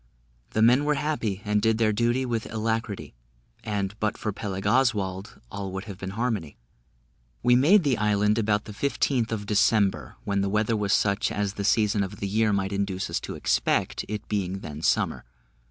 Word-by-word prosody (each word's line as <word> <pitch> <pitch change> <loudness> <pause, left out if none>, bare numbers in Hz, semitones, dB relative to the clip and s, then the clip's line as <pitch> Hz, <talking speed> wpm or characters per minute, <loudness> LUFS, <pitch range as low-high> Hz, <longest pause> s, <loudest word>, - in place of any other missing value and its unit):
The 110 - +1
men 125 +5 +5
were 150 0 +2
happy, 115 -10 -2
and 105 0 +1
did 110 0 +2
their 110 -2 +2
duty 120 +4 +1
with 115 -2 -3
alacrity; 110 -2 -2 0.5
and 100 -2 -2
but 105 -1 -1
for 105 - -2
Peleg 95 -2 -5
Oswald, 100 -5 0
all 100 -1 -5
would 95 0 -4
have 100 -3 -9
been 95 +2 -6
harmony. 110 -11 -2 0.9
We 125 0 +5
made 165 +10 +5
the 135 -6 +1
island 105 +1 +2
about 105 -1 +1
the - - -8
15th 125 -1 0
of 105 -2 -3
December, 105 -1 +2
when 100 -1 0
the 100 - 0
weather 110 +2 +1
was 105 -2 -1
such 105 +3 +2
as 100 -1 -1
the 100 - -4
season 105 0 +2
of 100 +1 -3
the 100 - -2
year 110 +2 +2
might 100 0 -1
induce 100 -1 -2
us - - 0
to - - -7
expect, - - 0
it 105 0 -5
being 95 -2 -2
then 75 +1 -7
summer. - - +1
105 Hz, 185 wpm, -26 LUFS, 100-115 Hz, 0.9 s, men